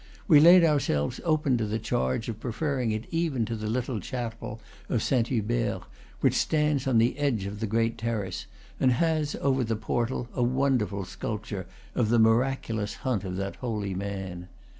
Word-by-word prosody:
We 155 -7 +8
laid 170 +3 +8
ourselves 140 - +1
open 150 -6 +2
to 110 - -1
the 105 +2 -1
charge 85 - -1
of 110 -2 -5
pre 120 - -4
ferring 130 -2 -1
it 110 +2 -3
even 160 -8 0
to 115 - -3
the 105 -1 -4
little 120 +1 -1
chapel 115 0 -5 0.3
of 115 - 0
Saint 120 -4 +2
Hubert, 115 -4 -1 0.4
which - - +4
stands 150 -3 +1
on 130 -3 +3
the 115 +5 +2
edge 130 -9 0
of 100 +1 -5
the 110 - -1
great 115 +2 0
terrace, 110 -5 -3 0.3
and 130 -1 +4
has, 155 +1 +1
over 135 -2 +2
the 115 -1 -1
portal, 120 +3 -2
a - - -2
wonderful 125 -6 +1
sculpture 105 0 -5 0.3
of 110 - +1
the 120 - +4
mi 110 0 +6
raculous 115 -3 -1
hunt 125 -8 -1
of 90 -2 -4
that 100 0 -4
holy 105 -6 -3
man. 95 -2 -5
115 Hz, 180 wpm, -27 LUFS, 105-130 Hz, 0.4 s, We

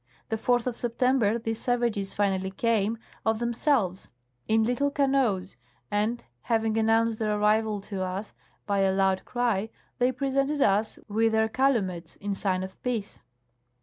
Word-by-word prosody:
The 220 - 0
4th 245 +2 +1
of 250 -2 -2
September 240 -2 +1
these 225 -1 -3
savages 235 -5 0
finally 190 -2 0
came, 220 +2 0 0.3
of 220 0 +1
them 235 +1 -1
selves, 225 - 0 0.4
in 220 0 +3
little 250 +5 +1
canoes, 265 - +1 0.3
and, 215 +3 0 0.2
having 225 - 0
announced 225 0 +2
their 215 -1 0
arrival 210 0 +2
to 195 -1 -5
us 185 +3 -4 0.3
by 200 -1 0
a 195 -1 +3
loud 190 -1 +1
cry, 230 -4 0 0.3
they 250 +1 +3
presented 275 +2 0
us 210 -2 +2
with 220 +1 +1
their 220 0 +3
calumets, 205 -10 0
in 200 0 -3
sign 190 -1 -1
of 190 0 -9
peace. 230 -5 -3
220 Hz, 150 wpm, -27 LUFS, 200-240 Hz, 0.4 s, in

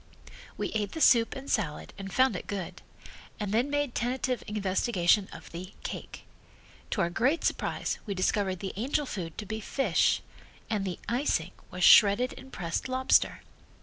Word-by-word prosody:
We - - -2
ate 210 -2 -2
the - - -5
soup 230 -6 +5
and 270 +1 -8
salad 180 - -2
and 195 0 -7
found 260 -2 +3
it - - -6
good, 195 -4 -5 0.6
and 205 -2 -3
then 235 +6 +2
made 290 -3 0
tentative 250 0 -1
investigation 195 -1 +1
of 165 - -11
the 180 +3 -8
"cake." - - -7 0.7
To 200 - 0
our 170 -1 +1
great 260 - +1
surprise - - -1
we 200 - -2
discovered 190 0 0
the 195 - -4
angel 275 +7 0
food 175 - -6
to 210 - -5
be 220 +2 -4
fish 270 +6 +1 0.5
and 205 -3 0
the 180 -3 -3
"icing" 235 - 0 0.2
was 180 0 -4
shredded 210 +7 +7
and 265 - -12
pressed 170 +7 -3
lobster. 260 0 +2
210 Hz, 165 wpm, -29 LUFS, 185-255 Hz, 0.7 s, shredded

